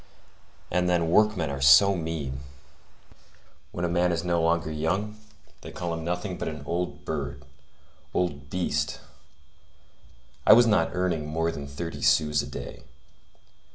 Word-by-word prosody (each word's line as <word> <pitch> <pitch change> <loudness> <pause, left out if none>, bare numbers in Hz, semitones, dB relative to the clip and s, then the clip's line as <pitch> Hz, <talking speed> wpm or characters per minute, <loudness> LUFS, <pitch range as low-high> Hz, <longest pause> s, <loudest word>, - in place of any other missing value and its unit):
And 90 0 +1
then, 85 -2 +1
workmen 105 -7 +3
are 70 0 -5
so 85 +9 +7
mean! 80 -6 -4 1.3
When 90 - -3
a - - +1
man 90 +1 +1
is 85 -1 -1
no 85 -1 +1
longer 85 -1 +1
young, 90 +8 -2 0.5
they - - -9
call 85 -1 -4
him 80 0 -5
nothing 90 +2 -3
but - - -3
an 75 -1 -6
old 90 +1 -3
bird, 70 -2 -4 0.7
old 70 -6 -2
beast! 90 +3 -1 1.4
I - - +8
was 120 +2 +7
not 105 -8 +3
earning 85 -4 -1
more 80 +2 -1
than 70 -3 -7
thirty 85 +4 -6
sous 75 -1 +3
a - - -7
day. - - -8
85 Hz, 145 wpm, -26 LUFS, 75-90 Hz, 1.4 s, I